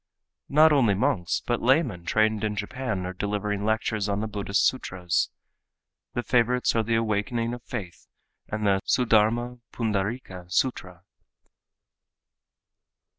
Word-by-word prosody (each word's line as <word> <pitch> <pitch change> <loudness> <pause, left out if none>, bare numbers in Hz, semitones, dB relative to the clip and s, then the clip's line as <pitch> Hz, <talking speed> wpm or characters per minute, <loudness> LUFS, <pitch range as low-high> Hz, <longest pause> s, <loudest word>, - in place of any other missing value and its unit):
Not 155 +2 +6
only 120 -8 +4
monks, 90 -3 0
but 120 -1 -1
laymen 125 - +2
trained 110 +2 +1
in 105 -1 -1
Japan 105 -2 -3
are 90 - -4
delivering 105 +1 -2
lectures 110 -1 0
on 100 0 0
the 110 - -2
Buddhist 100 -1 0
sutras. 90 - 0 0.9
The 120 - -1
favorites 125 0 +2
are 115 - +3
the 115 +1 0
Awakening 115 +2 0
of 120 - -7
Faith 95 - -7 0.4
and 105 0 -3
the 95 -1 +3
Suddharma 120 +1 +2
Pundarika 105 -3 -3
sutra. 90 -6 -1
110 Hz, 125 wpm, -26 LUFS, 100-120 Hz, 0.9 s, Not